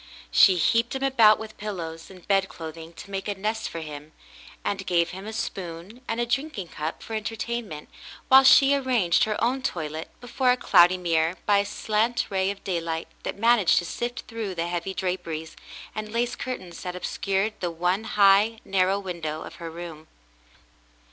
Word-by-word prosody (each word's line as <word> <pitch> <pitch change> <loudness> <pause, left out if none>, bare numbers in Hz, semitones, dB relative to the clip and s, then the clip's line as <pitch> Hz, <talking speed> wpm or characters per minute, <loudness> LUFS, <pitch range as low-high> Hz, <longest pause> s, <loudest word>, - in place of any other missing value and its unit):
She 190 - +7
heaped 230 +8 +2
him 265 - -3
about 230 -6 +6
with 220 0 -9
pillows 165 -6 -6
and 185 -2 -15
bedclothing 165 -4 -2
to 200 - -11
make 195 0 -4
a 205 - -2
nest 215 +3 -2
for 165 - -6
him, 150 0 -9 0.5
and 195 -1 -2
gave 170 -2 +2
him 190 +3 -8
a - - -4
spoon 190 +1 -6
and 225 - -2
a 240 - +1
drinking 240 - -2
cup 155 +1 -5
for 225 - -8
entertainment, 220 -5 -4 0.4
while 265 +1 +8
she 275 +1 +7
arranged 250 -11 +2
her 215 -1 -2
own 255 +3 +1
toilet 160 -8 -4
before 250 +1 0
a 250 - +4
cloudy 180 -5 +5
mirror 165 -1 +1
by 205 -1 +4
a 200 - 0
slant 220 +3 0
ray 190 0 +1
of 200 0 -6
daylight 165 -3 -3
that - - -5
managed 230 -3 +4
to 175 - +2
sift 240 +5 -4
through 220 -5 -5
the 165 0 -1
heavy 175 +2 -3
draperies 170 -4 -3 0.4
and 215 -1 -5
lace 240 +1 0
curtains 185 -9 -6
that 180 -1 -5
obscured 195 +3 -1
the 175 - -1
one 180 +5 -1
high, 205 +2 +4
narrow 190 0 +2
window 170 -5 -5
of - - -10
her 165 -1 -6
room. 165 -2 -9
195 Hz, 175 wpm, -25 LUFS, 170-225 Hz, 0.5 s, while